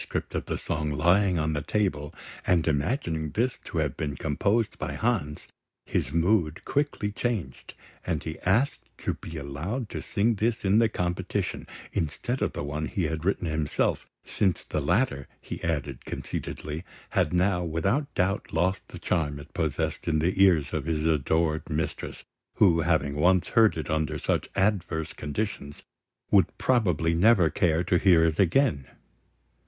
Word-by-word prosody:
of - - -2
the - - -2
song 75 0 -2
lying 90 +5 +3
on 80 0 0
the 75 - -1
table, 75 -6 -1 0.4
and 85 -3 +3
imagining 80 - 0
this 115 - -1
to - - -7
have - - 0
been 75 -3 -3
composed 100 +11 0
by - - -3
Hans, 100 -11 -1 0.4
his 65 - -1
mood 85 0 +1
quickly 140 -8 -1
changed, 105 - -3 0.3
and - - -2
he 80 - -5
asked 115 +10 +1
to - - -2
be 85 - -8
allowed 80 - -4
to - - -5
sing 110 +3 +1
this 110 +1 -1
in 100 +3 +5
the 115 -1 +4
competition, 90 -3 -2 0.3
instead 120 - -2
of - - 0
the - - -4
one 75 +2 -3
he 95 - -2
had 80 0 -2
himself 80 -5 0
written, - - -39 0.2
since 95 -4 0
the 75 - -2
latter, 85 - +1
he - - -7
added 70 -5 -2
conceitedly, 75 +2 -5 0.3
had - - +2
now 90 0 +2
without 95 - 0
doubt 95 +3 0
lost 90 +4 0
the - - -9
charm 75 -5 -1
it 70 +2 -12
possessed 80 -2 -2
in 80 -2 +2
the 90 +5 +3
ears 85 -7 +3
of 75 -3 -2
his 80 -1 0
adored 80 +1 +1
mistress, 80 0 -3 0.3
who, 85 -5 +5
having 80 -4 +1
once 90 +4 +3
heard 110 -5 +4
it 80 - -4
under 80 -2 0
such - - -1
adverse 90 -5 0
conditions, 75 -2 -4 0.5
would - - +4
probably 90 - +2
never 90 -1 +5
care 85 -1 +2
to 90 0 +2
hear 90 -4 +5
it 80 -2 0
again. 90 - +2
85 Hz, 160 wpm, -27 LUFS, 75-100 Hz, 0.5 s, in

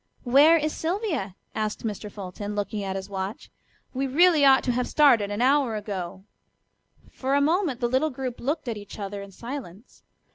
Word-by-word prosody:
"Where 285 +7 +6
is 305 -1 -1
Sylvia?" 320 - -2 0.2
asked 215 +1 -3
Mr. 210 -1 -4
Fulton, 205 +1 -6
looking 205 0 -2
at 190 -1 -3
his 190 0 -5
watch. 195 +1 -5 0.4
"We 270 +1 -1
really 320 +2 +4
ought 270 -1 +6
to 250 - +1
have 250 +1 -1
started 245 -9 +4
an 205 +4 -1
hour 265 -3 +3
ago." 190 -3 -5 0.9
For 270 +1 -1
a - - +4
moment 310 -2 +1
the 240 - +2
little 260 +6 +1
group 255 -3 -5
looked 290 +2 -2
at 230 -2 -2
each 205 -1 -10
other 200 -1 -5
in 200 0 -10
silence. 230 -2 -9
240 Hz, 180 wpm, -25 LUFS, 205-285 Hz, 0.9 s, Where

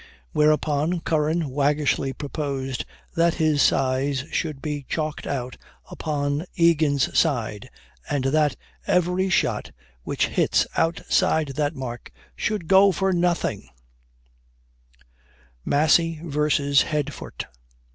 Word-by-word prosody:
Whereupon, 155 +2 +1
Curran 155 -1 0
waggishly 145 0 +1
proposed 135 -2 -4 0.3
that 170 -1 +3
his 155 -3 +2
size 135 +1 +1
should 155 -4 -2
be 145 0 -4
chalked 155 -2 -3
out 125 -2 -4 0.3
upon 145 +1 -2
Egan's 155 -5 +2
side, 120 -7 0 0.4
and 145 -3 0
that 150 +2 +2 0.3
"every 180 +2 +2
shot - - 0 0.3
which - - 0
hits - - +2
outside 160 -2 +1
that 145 +2 -1
mark 120 -3 -7 0.2
should 210 -6 -2
go 195 +2 +6
for 190 +1 0
nothing!" 175 - 0 2.0
MASSY 160 +2 +3
VERSUS 145 -2 +2
HEADFORT. 150 -3 -4
150 Hz, 100 wpm, -24 LUFS, 140-165 Hz, 2.0 s, go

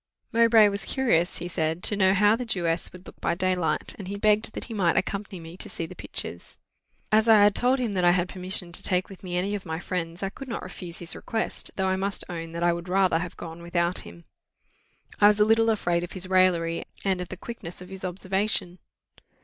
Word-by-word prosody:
Mowbray 230 -2 +6
was 200 0 -2
curious, 225 -11 +1
he 175 - -5
said, 160 0 -2
to 210 - +3
know 190 -1 +4
how 205 +2 +5
the 250 - -4
Jewess 170 -7 -1
would 180 0 -13
look - - -14
by 170 - 0
daylight, 180 -4 0
and 195 - -7
he 200 +1 -4
begged 215 +1 +2
that - - -4
he 230 - -7
might 185 -6 +2
accompany 195 -1 -2
me 165 +1 -10
to - - -3
see 165 - -4
the - - -9
pictures. - - -6 0.5
As 220 +1 +4
I 215 -2 +8
had 205 0 +5
told 250 +5 +2
him 245 -4 -1
that 185 -2 -1
I 175 - +6
had 175 0 +2
permission 185 -1 -2
to 170 - +3
take 180 0 +1
with 195 - -12
me 180 -2 -4
any 195 +3 -1
of 205 -2 -3
my 160 -1 -4
friends, 175 0 -4
I 195 - 0
could 270 +7 -10
not 235 - -4
refuse 175 -2 -7
his 170 -2 -1
request, 225 -1 -2
though 190 -1 0
I 190 - +1
must 195 +1 -2
own 165 -2 -5
that 170 +1 -3
I 175 0 +4
would 170 +1 -6
rather 185 -3 +3
have 175 0 -6
gone 165 0 -8
without 170 +1 0
him. 85 0 -12 0.9
I 205 - +8
was 210 0 +4
a 210 - +6
little 225 +1 +4
afraid 175 -6 +1
of 175 - -7
his 185 -1 -2
raillery, 180 -3 +2 0.2
and 190 -2 +1
of 180 - -5
the 185 - -7
quickness 185 -5 -7
of 180 0 -9
his 190 0 -8
observation. 190 0 -1
185 Hz, 235 wpm, -26 LUFS, 175-205 Hz, 0.9 s, I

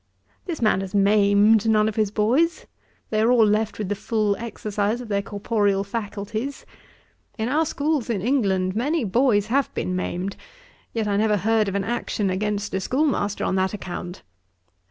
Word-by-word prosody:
This 325 -8 -3
man 215 -3 +3
has 195 +1 -6
maimed 205 +2 +4
none 215 -1 +4
of 220 - -2
his 215 -2 +1
boys. 250 +12 +1 0.5
They 215 -1 +1
are 230 +2 +4
all 235 -3 +5
left 215 +1 0
with 210 - -3
the 205 - 0
full 210 0 0
exercise 215 -1 -2
of 245 -3 -8
their 200 -1 +1
corporeal 205 -1 0
faculties. 215 +4 -5 0.7
In 220 0 -1
our 305 +5 +1
schools 290 -5 -1
in 220 -4 0
England, 190 -5 +1
many 290 +7 0
boys 220 0 +2
have 275 -1 +2
been 185 - -2
maimed; 185 +1 -3 0.5
yet 225 -2 -2
I 200 -1 +1
never 210 0 +2
heard 215 +2 +2
of 195 - -5
an 200 - 0
action 210 -3 -2
against 205 +2 -2
a 190 - 0
schoolmaster 255 - 0
on - - 0
that 190 +2 0
account. 180 -2 -7
210 Hz, 175 wpm, -23 LUFS, 200-230 Hz, 0.7 s, all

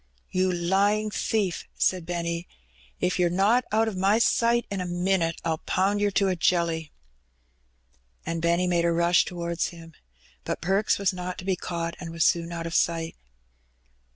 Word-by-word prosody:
"You 185 0 +1
lying 200 +5 +1
thief 205 -4 -1
!". - - -38
said 180 -3 +1
Benny. 170 0 -3 0.5
"If 180 +1 0
yer 175 -1 +3
not 205 +8 +3
out 220 +1 +2
o' - - 0
my 195 +3 +2
sight 235 0 +2
in 195 -2 -2
a - - -3
minit 175 -1 0
I'll 160 -1 0
pound 200 +2 0
yer 205 - +3
to 200 0 +1
a 185 - +1
jelly." 165 -3 0 1.3
And 165 0 -3
Benny 170 +2 +2
made 175 -1 +1
a 170 - +3
rush 170 +1 +3
towards 170 -1 -2
him. 165 -1 -11 0.5
But - - -3
Perks 195 +4 +1
was 200 -1 +1
not 180 0 -5
to 185 - -8
be 190 -1 +1
caught, 170 -1 -4
and 175 -3 -6
was 165 0 0
soon 170 0 +1
out 165 -1 -4
of 165 - -5
sight. 165 -1 0
180 Hz, 180 wpm, -26 LUFS, 170-195 Hz, 1.3 s, yer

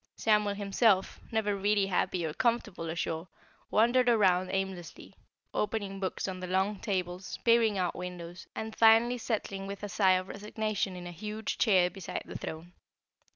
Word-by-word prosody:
Samuel 210 -2 +2
himself, 200 0 +2
never 215 -2 +1
really 200 0 +2
happy 180 -2 0
or 155 - -3
comfortable 215 -6 -1
ashore, 165 +1 -3 0.4
wandered 245 +3 +4
about 185 -5 +4
aimlessly, 190 -3 -4 0.4
opening 205 -2 -2
books 190 0 -2
on 185 -1 -4
the 185 - -5
long 190 +2 0
tables, 185 -2 -3
peering 230 -3 +4
out 180 -2 0
windows, 180 0 -7
and 220 0 -5
finally 230 +2 +5
settling 200 -4 -3
with 200 +1 -7
a 205 - -3
sigh 190 -2 +4
of 185 0 0
resignation 210 -1 -3
in 180 -1 -8
a 175 - -6
huge 210 +5 -5
chair 185 -5 +4
beside 190 -1 -5
the - - -9
throne. 165 +3 -7
195 Hz, 155 wpm, -30 LUFS, 180-215 Hz, 0.4 s, finally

